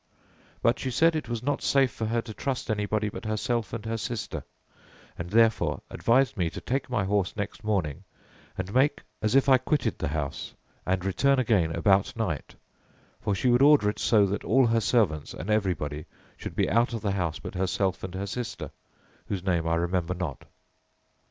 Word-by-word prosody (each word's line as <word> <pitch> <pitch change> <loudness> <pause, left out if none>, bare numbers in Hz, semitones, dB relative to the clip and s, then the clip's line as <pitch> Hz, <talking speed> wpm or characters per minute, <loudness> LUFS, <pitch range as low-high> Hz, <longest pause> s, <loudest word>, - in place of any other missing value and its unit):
But 115 - +3
she 130 - -2
said 165 +6 +3
it 155 -6 -3
was 120 -1 -3
not 145 +1 0
safe 135 -2 +3
for 110 - -3
her 115 +1 0
to 110 - -8
trust 130 -1 -3
anybody 105 0 0
but 105 - -6
herself 110 +1 -1
and 115 -2 -5
her 115 0 -2
sister, 115 -2 -4 0.7
and 85 +1 -6
therefore 115 +2 +3
advised 130 +1 +2
me 85 -3 +1
to - - -7
take 130 +1 -2
my 120 -5 0
horse 95 -1 0
next 105 +1 -4
morning 95 -6 -1 0.5
and 95 +2 -4
make 140 +3 +2 0.2
as 110 +3 +1
if 135 - +5
I 130 -2 +6
quitted 135 +1 -1
the - - -1
house, 75 -1 -4 0.3
and 95 0 0
return 135 +8 +2
again 100 -10 +2
about 95 +6 +3
night; 95 -11 -3 0.6
for 100 - -1
she 125 - +1
would 120 +1 +4
order 140 -8 +6
it - - -12
so 105 -3 +4
that 100 +1 -2
all 130 +3 +4
her 115 -1 +2
servants 100 - +1
and 95 +7 -4
everybody 85 -8 -1 0.3
should - - -7
be - - +2
out 120 +3 +2
of 115 - -4
the 100 - 0
house 90 -5 -1
but - - -8
herself 95 0 -1
and 95 -1 -5
her 95 +1 -3
sister, 120 +4 -5 0.6
whose 95 -3 -3
name 85 -4 0
I 85 - +2
remember 85 +1 -1
not. 85 -6 -5
105 Hz, 190 wpm, -27 LUFS, 95-120 Hz, 0.7 s, I